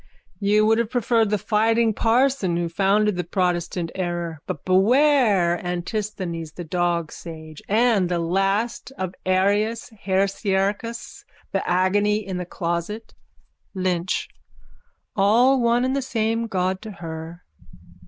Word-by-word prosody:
_ - - -32 0.4
You 210 +1 +3
would 225 +1 +3
have 235 -2 0
preferred 230 -2 +2
the 210 - +1
fighting 225 +2 +2
parson 230 -5 +2
who 170 -1 -1
founded 200 +3 +2
the 180 - -1
protestant 175 -1 -1
error. 175 -3 -3
But 145 - -5
beware 200 - +3
Antisthenes, 180 -3 -4
the 175 - -7
dog 170 -1 -1
sage, 160 -2 -10
and 215 -4 +3
the 175 - 0
last 195 +9 0
end 185 -1 -2
of 180 - -19
Arius 205 +5 +1
Heresiarchus. 200 +2 -1 0.3
The 195 - -2
agony 200 +4 +2
in 190 -2 -4
the 180 -1 -5
closet. 175 +6 -4 0.6
LYNCH: 185 -1 -1 0.9
All 240 +7 +4
one 235 +1 +2
and 260 +1 0
the 275 - 0
same 230 -2 -1
God 185 -2 -1
to 215 -1 -8
her. 165 -1 -8
195 Hz, 135 wpm, -23 LUFS, 175-225 Hz, 0.9 s, All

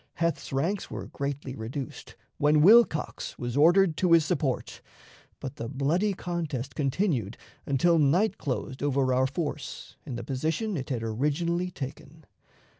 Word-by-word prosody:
Heth's 170 0 -1
ranks 170 +9 -1
were - - -6
greatly 140 -1 -4
reduced, 125 +4 -6 0.2
when 150 +1 +4
Wilcox 215 -5 +4
was 120 0 -4
ordered 170 +3 +5
to 180 -2 +3
his 165 -2 +6
support, 150 -6 -2 0.6
but 135 -3 -7
the 115 - -5
bloody 165 +10 +1
contest 155 -8 -4
continued 135 - -1 0.3
until 165 +5 +3
night 170 +9 +2
closed 130 -1 -4
over 135 -2 +1
our 130 +1 +3
force 145 -1 -5
in 135 -6 -6
the 120 - -5
position 160 - -2
it 135 -5 -4
had 120 -4 -2
originally 150 +10 0
taken. 145 0 -8
145 Hz, 140 wpm, -28 LUFS, 130-170 Hz, 0.6 s, his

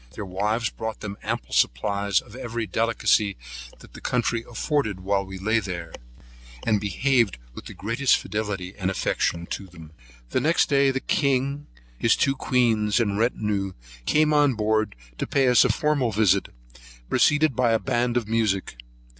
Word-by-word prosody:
Their 105 - -5
wives 105 +5 -1
brought 110 -1 -6
them 100 -2 -5
ample - - -4
supplies 100 +10 +1
of 105 - -15
every 115 -3 -4
delicacy 110 -2 +1 0.4
that - - -16
the - - -11
country 120 -1 0
afforded 115 - -1
while 100 +1 0
we 95 0 -8
lay 110 +4 +1
there, 85 -5 -6 0.7
and 105 -3 +2
behaved 115 - +1 0.2
with - - -10
the - - -9
greatest 120 +6 +2
fidelity 100 -3 -4
and 95 -1 -2
affection 85 -2 -1
to 100 - -4
them. 80 -3 -13 0.4
Next 160 +3 +2
day 140 -1 +4
the 135 0 -1
king, 140 0 0 0.3
his 115 - +4
two 135 -1 +1
queens, 115 -5 +2
and 105 -3 0
retinue, 105 -4 0 0.3
came 155 0 +3
on 145 -4 +4
board 110 -1 0 0.2
to - - -2
pay 135 -2 +2
us 125 -2 +6
a - - +2
formal 145 -6 +1
visit, 105 -2 +2 0.6
preceded 150 - +3
by 125 -2 +2
a 115 - +4
band 120 -1 0
of 115 -4 -1
music. 105 - 0
110 Hz, 160 wpm, -24 LUFS, 100-125 Hz, 0.7 s, us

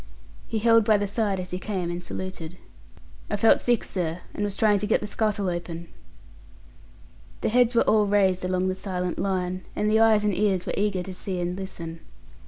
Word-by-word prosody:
He 225 - -2
held 230 +1 +5
by 215 0 +4
the 205 - -1
side 200 -1 -1
as 185 0 -5
he 180 - -3
came, 185 -4 -3
and 175 +1 -4
saluted. 180 -3 -6 0.7
"I - - 0
felt 225 +2 +5
sick, 240 -2 +2
sir, 175 -2 -3
and 205 - -3
was 205 -1 -2
trying 210 -2 +3
to 210 - -2
get 220 - +3
the - - -5
scuttle 210 -2 -1
open." 170 -1 -4 1.5
The - - +1
heads 245 +1 +3
were - - +5
all 210 -1 +3
raised 190 -3 +2
along 185 0 0
the 185 - 0
silent 180 -2 -3
line, 185 -1 -1
and 210 0 +1
eyes 220 -1 +4
and 205 -3 +1
ears 195 -4 +1
were - - -3
eager 200 -3 0
to 190 - -7
see 185 0 -3
and 175 0 -2
listen. 170 -4 -6
195 Hz, 195 wpm, -25 LUFS, 180-210 Hz, 1.5 s, held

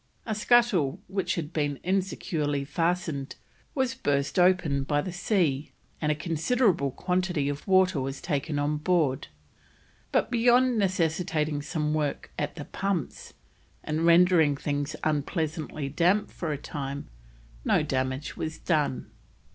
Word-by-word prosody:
A 225 - -2
scuttle 215 - +3
which 190 0 -1
had 165 -1 -4
been 145 -3 -1
insecurely 165 -6 -1
fastened 165 -3 -1 0.4
was 260 -2 +1
burst 145 - 0
open 180 -6 +3
by 145 +2 +1
the 180 +5 -3
sea, 175 -6 0 0.3
and 150 -1 +2
a - - +1
considerable 165 - +1
quantity 180 0 -1
of 145 +5 -5
water 185 -5 +4
was 135 +1 -4
taken 145 -2 -2
on 145 +1 0
board, 150 -5 +1 0.8
but - - +1
beyond 245 0 +4
necessitating 165 -5 0
some 150 0 -2
work 150 -2 -2
at - - -2
the - - -7
pumps 195 -6 -3 0.5
and 155 +1 -1
rendering 170 -4 +5
things 145 0 -2
unpleasantly 155 -1 -2
damp 180 +8 +2
for 165 -3 -4
a 145 - -2
time, 140 -1 -5 0.6
no - - +3
damage 130 0 -2
was 155 0 -4
done. 150 -6 -1
155 Hz, 130 wpm, -27 LUFS, 145-185 Hz, 0.8 s, rendering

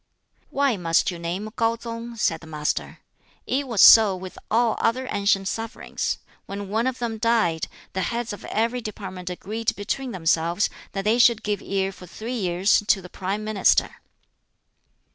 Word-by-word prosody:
"Why 275 -5 +1
must 165 0 +2
you 175 - -7
name 180 +6 -4
KŠu 230 0 +1
tsung?" 230 0 -6
said 165 -7 0
the 165 - -12
Master. 150 -1 -3 0.4
"It 275 +2 -1
was 230 -6 +4
so 215 -4 +9
with 185 0 -8
all 230 0 +2
other 255 +3 0
ancient 200 -1 +1
sovereigns: 225 +4 -3 0.3
when 200 0 -6
one 225 +4 +1
of 260 -1 -2
them 230 -2 -3
died, 215 -9 +1 0.3
the 190 - -1
heads 235 +4 -2
of 205 - -9
every 235 +3 -1
department 195 -4 -6
agreed 215 +5 -3
between 245 +6 -3
themselves 170 +1 +1 0.2
that 195 -1 -2
they 225 +3 +3
should 235 -3 +5
give 210 -1 -1
ear 195 0 -1
for 185 -2 -13
three 225 +7 -6
years 185 -3 +2
to 205 - +4
the 180 -1 -11
Prime 195 +3 -3
Minister." 215 -2 +2
210 Hz, 165 wpm, -24 LUFS, 185-230 Hz, 0.4 s, so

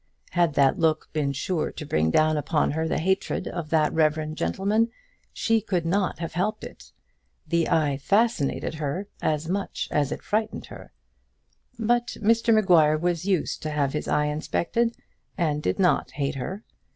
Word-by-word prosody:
Had 170 -4 +2
that 140 +6 +3
look 160 -2 +1
been 150 -3 0
sure 155 +4 -2
to 150 - -7
bring 80 - +1
down 155 - +3
upon 150 +1 +1
her 160 +2 -1
the - - 0
hatred 190 +5 -1
of 170 -4 -5
that 155 -2 +2
reverend 155 0 +1
gentleman, 205 - +1 0.4
she 225 -1 +1
could 185 -5 -1
not 190 +3 0
have 165 0 -5
helped 215 +5 -1
it. - - -11 0.6
The 170 -1 +1
eye 150 -4 +2
fascinated 205 -3 +1
her, 155 +5 -3 0.2
as 155 +1 0
much 195 +3 -2
as 145 -2 +1
it - - -5
frightened 215 +1 -2
her. - - -12 0.9
But 240 +1 0
Mr 230 +2 +3
Maguire 175 -8 +5
was 175 +1 -1
used 190 -5 0
to 155 - -3
have 145 -2 0
his 150 - -3
eye 150 - +2
inspected, 170 +10 -1 0.4
and 155 -5 0
did - - -1
not 185 -3 +2
hate 140 -1 -2
her. 185 - -5
165 Hz, 165 wpm, -25 LUFS, 150-195 Hz, 0.9 s, Maguire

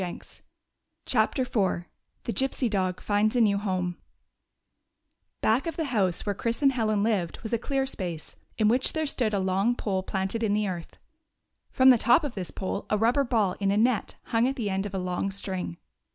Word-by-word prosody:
44 180 -2 -4 0.9
CHAPTER 265 - +1
IV 195 -8 0 0.4
THE 230 - -3
GYPSY 265 +2 0
DOG 185 -3 -1
FINDS 210 +2 +1
A 245 - +4
NEW 200 -3 +3
HOME 185 -3 -2 1.5
B - - +2
ACK 235 +9 +2
of 330 - -4
the 325 - 0
house 190 -6 +1
where 205 - 0
Chris 230 +7 -3
and 275 - +6
Helen 215 -5 0
lived 200 -7 0
was 220 - -5
a 230 - +2
clear 270 +2 -1
space, 175 -11 -5 0.2
in 215 - +3
which 250 +4 +3
there 315 -1 -1
stood 235 -7 +1
a - - +1
long 195 +5 +1
pole 195 -5 -1
planted 190 +4 -2
in 210 -2 +1
the 210 -1 0
earth. 175 -3 -6 0.7
From 260 0 +6
the 245 - +4
top 240 +9 +4
of 285 -5 -3
this 185 -5 -5
pole 195 +1 -4
a 210 - +2
rubber 235 +6 +3
ball 220 -7 +1
in 200 -1 +1
a 200 - +2
net 230 0 +1
hung 230 +2 +1
at 270 - -1
the 220 -7 -2
end 195 +1 -1
of 195 - -7
a - - 0
long 180 +1 -2
string. 190 - -4
210 Hz, 205 wpm, -27 LUFS, 190-240 Hz, 1.5 s, and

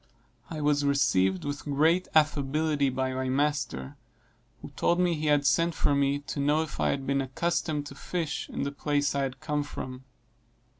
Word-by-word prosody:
I 155 -2 -5
was 145 0 +2
received 95 -10 +2
with 145 0 -4
great 160 +5 +2
affability 150 -1 +2
by 130 0 -1
my 130 0 -2
master, 140 - -1 0.7
who - - -7
told 175 - +1
me 180 -1 +3
he 155 -1 -2
had 145 -1 +3
sent 165 +6 +2
for 145 - +2
me 140 0 +2
to 145 - -5
know 150 +3 +2
if 160 - -8
I - - +2
had 135 -1 -2
been 140 0 +1
accustomed 150 +2 -1
to 145 - -8
fish 160 +1 -4
in - - -3
the 140 - -2
place 145 0 0
I 140 - 0
had 135 -1 -3
come 150 0 -1
from. 130 -3 -7
145 Hz, 185 wpm, -28 LUFS, 135-155 Hz, 0.7 s, me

